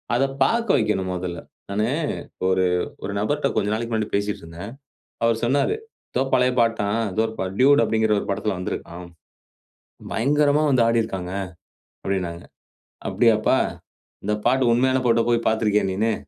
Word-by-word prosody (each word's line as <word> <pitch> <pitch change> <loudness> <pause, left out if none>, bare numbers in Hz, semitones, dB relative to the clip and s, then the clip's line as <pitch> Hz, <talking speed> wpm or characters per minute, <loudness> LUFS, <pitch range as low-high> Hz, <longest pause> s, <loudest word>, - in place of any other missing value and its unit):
அத 125 - +2 0.2
பார்க்க 230 - +2
வைக்கணும் 95 -4 0
முதல்ல. 90 -1 -4 0.3
நானு 105 +2 0 0.6
ஒரு 95 0 +2 0.4
ஒரு 100 - -3
நபர்கிட்ட 145 +8 0
கொஞ்ச 105 -1 +1
நாளைக்கு 115 +2 -3
முன்னாடி 110 -1 -2
பேசிட்டு 100 +1 -1
இருந்தேன். 85 +6 -8 0.5
அவர் 115 -1 +2
சொன்னாரு, 140 - +2 0.4
"எதோ 125 - +1
பழைய 125 0 +3
பாட்டாம், 115 -2 +1
ஏதோ 110 - +1
ஒரு 110 - -8
பாட் 95 +1 -3
டியூட் 140 +3 +6
அப்படிங்கிற 110 -1 +1
ஒரு - - -4
படத்தில 100 0 -1
வந்திருக்காம். 90 -1 -6 1.1
பயங்கரமா 145 +5 +2
வந்து 125 -4 +4
ஆடியிருக்கறாங்க" 95 -6 -1 0.7
அப்படின்னாங்க. 90 -3 -3 0.7
அப்படியாப்பா, 110 -3 +3 0.7
இந்த 105 +1 +1
பாட்டு 125 0 +3
உண்மையான 130 +2 +2
பாட்ட 115 0 +3
போய் 115 -1 +1
பார்த்து 110 0 +1
இருக்கியா 105 0 +2
நீன்னு. 110 +4 +1
110 Hz, 145 wpm, -23 LUFS, 100-120 Hz, 1.1 s, டியூட்